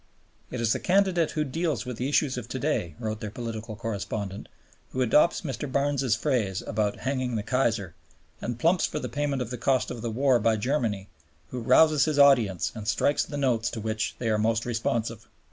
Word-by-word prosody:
"It - - -5
is 115 -1 +2
the - - -2
candidate 185 -3 +2
who 155 - +2
deals 150 -4 -2
with 125 -2 -5
the 130 +3 -1
issues 145 -2 +2
of 125 -3 -5
to 130 - -3
day," 125 - -1
wrote 110 -1 -4
their 105 - -5
Political 115 -1 -6
Correspondent, 100 -2 -4 0.4
"who 130 - +1
adopts 150 +8 +4
Mr. 135 -3 -4
Barnes's 140 -4 +1
phrase 115 -8 -1
about 105 -2 -1
'hanging 130 -2 -1
the 105 - -1
Kaiser' 110 -6 0 0.5
and 120 -1 -3
plumps 170 +7 +3
for - - -5
the - - -3
payment 145 -3 -1
of 120 - -9
the 125 - -4
cost 130 +1 +1
of 120 -2 -6
the 120 - -2
war 125 +2 +3
by 110 0 +2
Germany, 110 -5 -1 0.4
who 125 - -4
rouses 155 +4 +5
his 155 -2 -1
audience 120 -10 +4
and 110 -2 -7
strikes 140 +6 +2
the 145 - -6
notes 125 -5 +1
to 115 - -6
which 110 0 -2
they 115 - -2
are 105 - +1
most 115 +1 +1
responsive." 115 -2 -2
120 Hz, 200 wpm, -27 LUFS, 110-140 Hz, 0.5 s, rouses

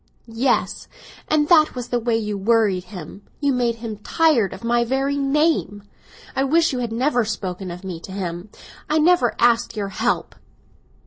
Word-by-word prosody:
"Yes; 230 +3 -1 0.4
and 300 -1 +2
that 310 -5 +5
was 245 -1 -5
the 245 - 0
way 235 -1 0
you 210 -2 -3
worried 200 -3 +1
him; 180 0 -10 0.2
you 285 -2 +1
made 240 -2 0
him 225 -2 -6
tired 275 - +2
of 190 - -10
my 235 0 +2
very 270 +3 0
name! 280 -7 0 0.5
I 265 - +1
wish 325 +3 +2
you 255 - -2
had 240 -2 -3
never 245 +1 +1
spoken 190 -3 -4
of 175 +2 -8
me 180 -3 -6
to 190 - -11
him; 180 0 -5 0.4
I 305 - +2
never 315 -6 +3
asked 235 -1 +2
your 200 -2 -2
help!" 225 +5 -1
235 Hz, 175 wpm, -21 LUFS, 200-275 Hz, 0.5 s, that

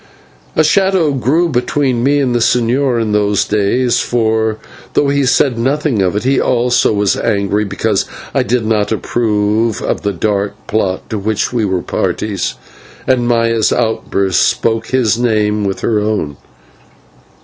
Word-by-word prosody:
A 155 - +4
shadow 190 -1 +2
grew 140 +6 +1
between 130 -2 0
me 140 +2 +3
and 130 -3 0
the 120 - +1
señor 120 +2 +1
in 110 -2 -1
those 105 -1 +1
days; 105 +4 +1
for, 110 -2 0 0.4
though 140 - +2
he 140 -1 +1
said 125 -1 +2
nothing 135 -2 0
of 95 0 0
it, 105 - -1
he 135 +1 +2
also 125 0 +2
was 105 -2 +1
angry 100 +1 0
because 100 -1 -1 0.3
I - - +2
did 120 -2 0
not 110 -1 0
approve 110 -1 0
of - - -2
the 100 - -1
dark 100 +1 -1
plot 95 -4 -2
to 110 - -2
which 110 +3 -1
we 115 -3 +1
were 95 -3 -1
parties, 100 -4 -2 0.5
and 125 -2 +1
Maya's 115 -2 +2
outburst 100 -5 0
spoke 115 -1 0
his 120 -4 +1
mind 105 -3 +1
with 95 - -4
her 110 -2 +1
own. 105 -9 -2
115 Hz, 155 wpm, -15 LUFS, 105-125 Hz, 0.5 s, A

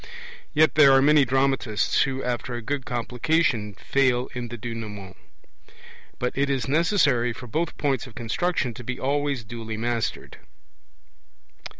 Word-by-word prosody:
Yet 155 +1 +5
there 145 -3 +7
are 135 - +6
many 150 -1 +5
dramatists 130 -4 +1
who, 135 -1 -1
after 125 0 -3
a 120 - -4
good 135 +2 -3
Complication, 120 - 0
fail 130 +1 +1
in 125 -1 -4
the 120 +1 -7
Denouement. 105 -5 -7 1.0
But 125 - -2
it 140 +1 +1
is 135 -2 -1
necessary 140 - +2
for 125 - -10
both 160 +8 -2
points 135 -3 -1
of 115 - -15
construction 125 +2 -1
to 120 - -10
be 125 +2 -5
always 140 -2 -1
duly 110 0 -6
mastered. 115 0 -3
125 Hz, 140 wpm, -25 LUFS, 120-140 Hz, 1.0 s, there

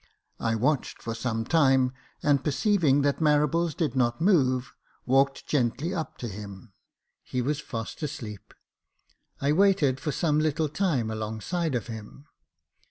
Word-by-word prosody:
I 115 0 0
watched 130 +5 0
for 115 - -4
some 115 -1 -2
time, 135 -4 +3 0.3
and 145 -3 +3
perceiving 150 -3 +2
that 140 -1 +1
Marables 155 +2 +2
did 150 -7 -1
not 120 -2 +1
move, 135 -9 +2 0.3
walked 135 +2 +2
gently 145 +5 0
up 165 -4 -4
to 120 - -5
him. 100 0 -9 0.5
He 125 - -4
was 140 +4 0
fast 115 -3 -6
asleep; 115 -9 -6 0.9
I 140 +1 +2
waited 155 -7 +3
for 150 +2 -2
some 150 -1 +1
little 155 0 0
time 140 - 0
alongside 110 +9 -2
of 120 - -2
him. 110 +4 -9
135 Hz, 140 wpm, -27 LUFS, 120-155 Hz, 0.9 s, time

